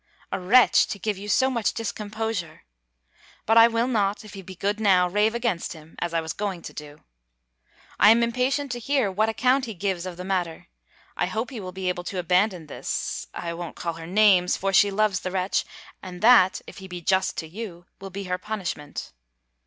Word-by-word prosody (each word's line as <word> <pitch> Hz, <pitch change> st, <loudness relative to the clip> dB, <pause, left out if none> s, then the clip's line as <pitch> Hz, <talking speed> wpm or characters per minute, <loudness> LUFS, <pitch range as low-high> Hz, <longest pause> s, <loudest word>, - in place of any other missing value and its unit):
A -, -, -2 dB
wretch! 230 Hz, +7 st, +5 dB
to -, -, -5 dB
give 210 Hz, +1 st, -2 dB
you 205 Hz, +1 st, -7 dB
so 265 Hz, +4 st, +3 dB
much 235 Hz, -4 st, 0 dB
discomposure! 215 Hz, -5 st, -4 dB, 0.8 s
But 225 Hz, -, +3 dB
I 230 Hz, -, +9 dB
will 230 Hz, +1 st, 0 dB
not, 210 Hz, -4 st, 0 dB
if 210 Hz, -, -12 dB
he 195 Hz, -, -8 dB
be 190 Hz, 0 st, -10 dB
good 205 Hz, +4 st, -1 dB
now, 185 Hz, -4 st, +4 dB
rave 210 Hz, +5 st, +1 dB
against 230 Hz, -9 st, -1 dB
him, 160 Hz, 0 st, -15 dB
as 175 Hz, -, -2 dB
I 165 Hz, -1 st, 0 dB
was 160 Hz, -1 st, -5 dB
going 195 Hz, -4 st, -4 dB
to -, -, -8 dB
do. 150 Hz, 0 st, -10 dB, 1.0 s
I 205 Hz, -, +8 dB
am 230 Hz, +2 st, +6 dB
impatient 255 Hz, +4 st, 0 dB
to 240 Hz, -, -3 dB
hear 260 Hz, -4 st, +1 dB
what 215 Hz, +4 st, +1 dB
account 255 Hz, +4 st, +2 dB
he 225 Hz, -3 st, -7 dB
gives 185 Hz, -1 st, -2 dB
of 180 Hz, -2 st, -7 dB
the 180 Hz, -, -6 dB
matter. 180 Hz, -, -3 dB, 0.5 s
I 180 Hz, -, 0 dB
hope 220 Hz, +8 st, -3 dB
he 245 Hz, -, -6 dB
will 185 Hz, -2 st, -6 dB
be 190 Hz, 0 st, -5 dB
able 180 Hz, -1 st, -2 dB
to 190 Hz, -, -5 dB
abandon 180 Hz, 0 st, +1 dB
this 150 Hz, -, -4 dB
I 170 Hz, -1 st, -4 dB
won't 170 Hz, 0 st, -7 dB
call 170 Hz, -1 st, -3 dB
her 165 Hz, 0 st, -9 dB
names; 190 Hz, -2 st, +4 dB
for 195 Hz, 0 st, -1 dB
she 200 Hz, +2 st, +6 dB
loves 200 Hz, -2 st, +1 dB
the 185 Hz, -, -4 dB
wretch; 185 Hz, +1 st, 0 dB, 0.4 s
and 180 Hz, 0 st, -9 dB
that, 225 Hz, -6 st, +6 dB
if -, -, -11 dB
he 190 Hz, -, -9 dB
be 180 Hz, -1 st, -7 dB
just 190 Hz, +3 st, +1 dB
to 160 Hz, -, -4 dB
you, 175 Hz, -1 st, -8 dB
will 195 Hz, 0 st, -8 dB
be 200 Hz, +1 st, -6 dB
her 180 Hz, -1 st, -3 dB
punishment. 185 Hz, -9 st, -5 dB
195 Hz, 210 wpm, -25 LUFS, 180-220 Hz, 1.0 s, I